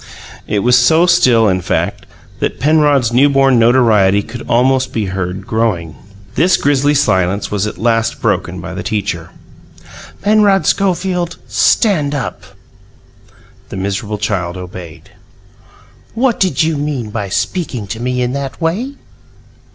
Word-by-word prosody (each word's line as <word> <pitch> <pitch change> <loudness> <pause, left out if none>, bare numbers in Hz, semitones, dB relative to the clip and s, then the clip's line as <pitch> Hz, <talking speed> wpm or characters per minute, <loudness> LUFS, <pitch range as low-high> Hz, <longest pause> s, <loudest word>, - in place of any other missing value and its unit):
It 105 -1 -1
was 125 0 +4
so 160 +8 +4
still, 125 -10 +4
in 95 -2 +1
fact, - - -2 0.3
that - - -2
Penrod's 145 -4 +2
newborn 135 -1 +4
notoriety 110 -5 +3
could 120 +3 -9
almost 130 +2 +2
be 110 -3 -1
heard 95 +1 -4
growing. 95 -9 -1 0.4
This 185 +2 +3
grisly 145 +1 +1
silence 100 -7 +1
was 105 0 -1
at - - -7
last 115 -1 0
broken - - -1
by - - -7
the - - -5
teacher. 100 -6 -3 0.9
"Penrod 205 -2 +3
Schofield, 180 -3 0
stand 155 -10 +2
up!" 135 -5 -4 1.3
The - - -7
miserable 100 +2 -3
child 95 -4 -2
obeyed. 90 -3 -10 1.0
"What 240 0 +1
did 185 -3 +1
you 160 -1 0
mean 140 -7 -3
by 105 -3 -4
speaking 130 - -2
to 110 - -5
me 125 +1 -1
in 125 +1 -2
that 135 -4 -5
way?" 205 +12 -2
125 Hz, 135 wpm, -15 LUFS, 105-150 Hz, 1.3 s, was